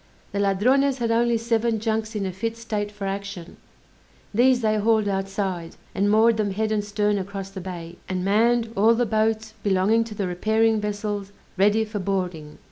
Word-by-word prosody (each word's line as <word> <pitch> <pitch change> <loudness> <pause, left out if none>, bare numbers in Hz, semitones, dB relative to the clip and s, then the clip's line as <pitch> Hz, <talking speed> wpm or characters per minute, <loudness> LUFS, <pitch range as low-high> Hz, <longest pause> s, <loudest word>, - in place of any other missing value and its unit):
The 200 - -2
Ladrones 255 +8 +2
had 235 -2 -1
only 235 0 +2
seven 230 0 0
junks 220 0 -2
in 200 -2 -1
a 190 - -2
fit 225 +5 -4
state 210 -3 -3
for 205 -1 -7
action; 195 -3 -5 0.8
these 250 +3 +4
they 215 -1 +2
hauled 215 0 +2
outside, 195 -3 -3 0.2
and 200 +1 +1
moored 220 +2 +4
them 210 -2 0
head 215 +3 -1
and 210 -1 0
stern 205 0 0
across 195 0 -6
the 195 -1 -7
bay; 175 -2 -7
and 185 -1 -2
manned 230 +3 +2
all 220 +4 +5
the 245 +1 +1
boats 220 0 0
belonging 205 +3 +2
to 220 -2 -8
the 200 - -2
repairing 220 +4 +1
vessels 205 -1 -3 0.2
ready 210 +3 +3
for 215 -1 -5
boarding. 180 -6 -3
210 Hz, 180 wpm, -24 LUFS, 195-225 Hz, 0.8 s, all